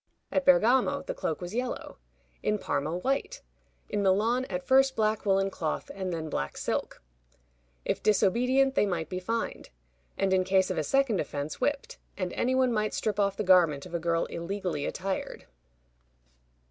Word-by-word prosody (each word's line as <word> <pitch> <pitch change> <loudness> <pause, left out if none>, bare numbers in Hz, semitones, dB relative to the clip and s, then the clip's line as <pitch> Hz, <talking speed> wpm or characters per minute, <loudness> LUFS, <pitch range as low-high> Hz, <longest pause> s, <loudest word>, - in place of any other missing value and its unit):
At 280 -1 0
Bergamo 260 -1 +4
the - - -4
cloak - - -3
was 175 +2 -6
yellow; 250 - -4 0.4
in 210 - +1
Parma, 160 -3 -2
white; 270 +9 -2 0.4
in 205 - -1
Milan, 215 +6 +2
at 180 -6 -4
first 270 0 +4
black 215 -1 0
woolen 195 0 +2
cloth, 160 -4 -3
and 190 -2 -4
then 160 -2 -3
black 70 - -3
silk. - - -3 0.8
If - - -1
disobedient, 250 +7 +3
they 210 - +2
might 165 -5 -2
be 185 - -3
fined; 230 +5 -3 0.5
and 195 -1 +1
in 185 0 +3
case 190 0 +2
of 185 - -3
a - - 0
second 265 - +2
offense, 145 - -5
whipped; 285 +2 -1 0.2
and 185 -2 -3
any 255 +2 0
one 260 -2 +3
might 215 -1 0
strip 210 -1 -1
off 200 -1 +1
the - - -1
garment 170 -7 +4
of 180 - -11
a 170 - 0
girl 165 0 0
illegally 170 -3 -3
attired. 190 0 -4
195 Hz, 170 wpm, -28 LUFS, 180-245 Hz, 0.8 s, Bergamo